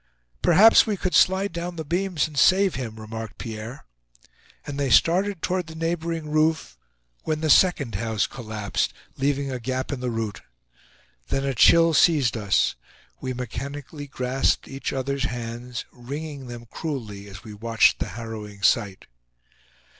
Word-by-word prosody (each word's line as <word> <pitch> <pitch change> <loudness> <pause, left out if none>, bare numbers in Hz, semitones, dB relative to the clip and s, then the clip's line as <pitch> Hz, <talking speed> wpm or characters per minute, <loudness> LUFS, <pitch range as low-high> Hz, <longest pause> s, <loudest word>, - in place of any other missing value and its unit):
"Perhaps 210 +8 +7
we 210 -2 -1
could 185 0 -2
slide 190 0 +3
down 175 +1 -4
the 160 -1 -5
beams 175 0 0
and 155 - -13
save 185 +5 +4
him," 110 -4 -5
remarked 110 0 -7
Pierre. 115 +2 -7 0.8
And 145 -1 -5
they 140 -2 0
started 180 - +3
toward 180 -2 -1
the 160 - -10
neighboring 165 -1 -3
roof, 155 - +1 0.5
when 155 -1 -2
the 155 -2 +2
second 155 -10 +4
house 110 0 0
collapsed, 110 -4 -3 0.2
leaving 140 0 0
a 130 - -3
gap 130 +3 -3
in 140 - -3
the 125 0 -2
route. 110 -4 -3 0.9
Then 135 - -1
a 135 - 0
chill 165 +6 +6
seized 145 -6 +4
us. 105 -3 +2 0.5
We 130 -1 -4
mechanically 140 +4 -6
grasped 130 0 0
each 135 0 -4
other's 135 0 -2
hands, 120 0 -5
wringing 140 +2 -7
them 120 -1 -8
cruelly 115 -7 -6
as 100 +1 -11
we 110 -3 -9
watched 115 +2 +3
the - - -2
harrowing 105 -3 -7
sight. 100 -2 +2
135 Hz, 150 wpm, -24 LUFS, 115-160 Hz, 0.9 s, Perhaps